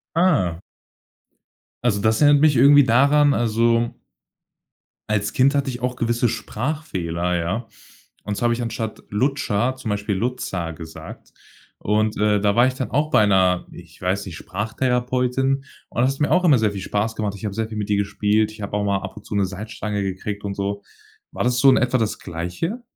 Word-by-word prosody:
Ah. 130 - +2 1.2
Also, 105 -4 +1
das 110 +5 +2
erinnert 145 0 +6
mich 150 -3 +5
irgendwie 145 +2 +7
daran, 140 +4 +4
also 115 +1 +1 1.2
als 105 -1 0
Kind 135 +3 +3
hatte 140 -1 0
ich 120 -1 -6
auch 125 0 -1
gewisse 120 -1 0
Sprachfehler, 105 - -3
ja? 95 +8 -3 0.6
Und 105 -1 -3
zwar 120 - 0
habe 120 - +2
ich 120 - -4
anstatt 115 -1 -4
Lutscher, 125 0 0
zum 120 -4 -5
Beispiel 105 0 -1
„Lutza“ 95 -7 -3
gesagt. 80 0 -11 0.5
Und, 110 +1 0
äh, 105 -1 +2
da 100 -1 +2
war 120 +2 +5
ich 130 - -3
dann 130 -1 -4
auch 150 +2 +1
bei 110 - +5
'ner- 95 -2 +2
ich - - -14
weiß 95 +2 -1
nicht- 85 -3 -7
Sprachtherapeutin. 125 +5 -1 0.2
Und 120 - 0
es 135 +2 -1
mir 150 - +1
auch 180 0 +3
immer 145 -7 +5
sehr 110 -2 +1
viel 100 - -5
Spaß 105 +4 -2
gemacht. 105 -2 -2
Ich 105 - -11
habe 100 -2 -3
sehr 110 0 -2
viel 110 - -7
mit 105 0 -4
ihr 100 - +3
gespielt. 105 +2 +1
Ich 110 -1 -11
habe 100 +1 -3
auch 105 - -1
mal 100 -1 +1
ab - - -8
und 105 - -11
zu - - -6
'ne 100 -1 +2
Salzstange 105 +1 -4
gekriegt 100 +2 -4
und 100 -1 -3
so. 100 +1 -3 0.5
War - - -2
das 125 0 +1
so 135 +1 +7
in 130 - +5
etwa 125 0 +2
das 110 -2 -1
Gleiche? 90 - -4
110 Hz, 195 wpm, -22 LUFS, 100-130 Hz, 1.2 s, irgendwie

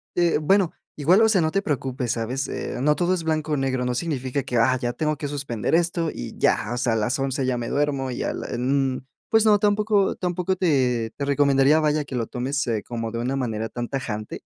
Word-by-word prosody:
eh, 175 -3 +2
bueno, 190 +2 +3 0.2
igual, 170 +8 +4
o 220 - +5
sea, 205 -4 +3
no 160 -2 +1
te 195 +2 +1
preocupes, 130 - -2
¿sabes?, 125 +4 -3
eh, - - -4
no 150 +2 +3
todo 180 +1 +2
es 175 -3 -2
blanco 155 -1 -1
o - - +1
negro, 130 -2 -1
no 125 - -1
significa 135 -2 -2
que, 125 -1 -2
ah, 130 +3 +3
ya 120 -1 -2
tengo 155 +5 -1
que 145 0 -5
suspender 140 -4 -3
esto 170 -1 +2
y - - -7
ya, - - +1
o - - -3
sea, 120 -1 +1
a - - +1
las 115 +4 0
11 135 0 -1
ya 130 -1 0
me 120 -1 -4
duermo 140 -3 0
y - - -3
a - - -1
la - - -5
n". 130 +1 0 0.3
Pues 225 0 +4
no, 210 -1 +6
tampoco 205 -1 +2
tampoco 180 +1 -1
te 125 - +1
te 140 - -3
recomendaría, 140 +1 +4
vaya, 150 -1 +1
que 140 -2 -7
lo 115 -2 -1
tomes, 135 +2 -2
eh, 110 -3 -1
como 115 -2 -4
de 115 - -2
una 125 +3 -1
manera 110 -3 -2
tan 120 0 -4
tajante. 110 -6 -5
135 Hz, 235 wpm, -24 LUFS, 125-160 Hz, 0.3 s, no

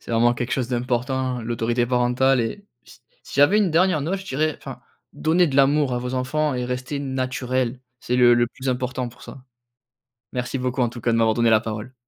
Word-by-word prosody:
...c'est - - -8
vraiment 120 +1 +4
quelque 120 0 -4
chose 130 -3 -1
d'important, 125 +1 -1
l'autorité 120 +1 0
parentale 125 +1 +2
et 115 - -4 0.2
s 120 - -17 0.2
si - - -11
j'avais 170 +9 +5
une 200 -4 +2
dernière 175 -1 +3
note, 175 +7 -2
je - - -11
dirais, 155 0 0
enfin: - - -9 0.3
«Donnez 170 +2 +2
de 135 - -2
l'amour 140 0 +3
à - - -1
vos 125 +1 -4
enfants 145 +3 0
et 125 0 -2
restez 130 +3 -4
naturels, 130 -2 -2 0.2
c'est 125 - -2
le 120 -1 +6
le 120 0 +2
plus 130 +2 -7
important 125 0 -2
pour 120 +1 -16
ça». 135 - -11 0.9
Merci 125 +1 -3
beaucoup, 125 0 -2
en 120 - +2
tout 120 0 -10
cas, 120 - +1
de 115 - +2
m'avoir 110 -1 +2
donné 120 -1 +3
la 110 - +6
parole. 110 +2 -6
125 Hz, 215 wpm, -23 LUFS, 120-135 Hz, 0.9 s, le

